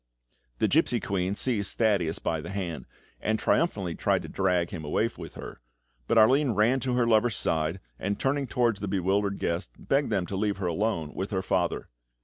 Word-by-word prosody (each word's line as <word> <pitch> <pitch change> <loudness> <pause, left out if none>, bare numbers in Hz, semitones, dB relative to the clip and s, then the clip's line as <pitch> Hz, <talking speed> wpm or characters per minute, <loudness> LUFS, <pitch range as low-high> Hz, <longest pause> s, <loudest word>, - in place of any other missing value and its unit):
The - - +2
gipsy - - +2
queen 95 0 -1
seized 105 -4 0
Thaddeus 100 -8 +2
by 80 -1 -2
the - - -8
hand, 85 -9 -4 0.3
and 110 0 0
triumphantly 100 - +1
tried - - 0
to - - -7
drag 90 -3 0
him 80 -4 -6
away 75 +9 +1
with 85 -2 -9
her; - - -9 0.5
but - - +2
Arline 130 +4 +5
ran 115 +6 +3
to 125 -1 -1
her 125 -1 +3
lover's 115 0 +3
side, 80 +3 0 0.2
and 100 +1 -2
turning 135 0 0
towards 120 -5 +1
the 100 - -4
bewildered 100 +1 0
guests, 85 -6 -2
begged 140 +1 0
them 100 -5 0
to 95 - -5
leave 100 +1 0
her 95 - -3
alone 85 -3 -1
with 95 - -3
her 95 -3 -2
father. - - 0
100 Hz, 190 wpm, -27 LUFS, 90-115 Hz, 0.5 s, Arline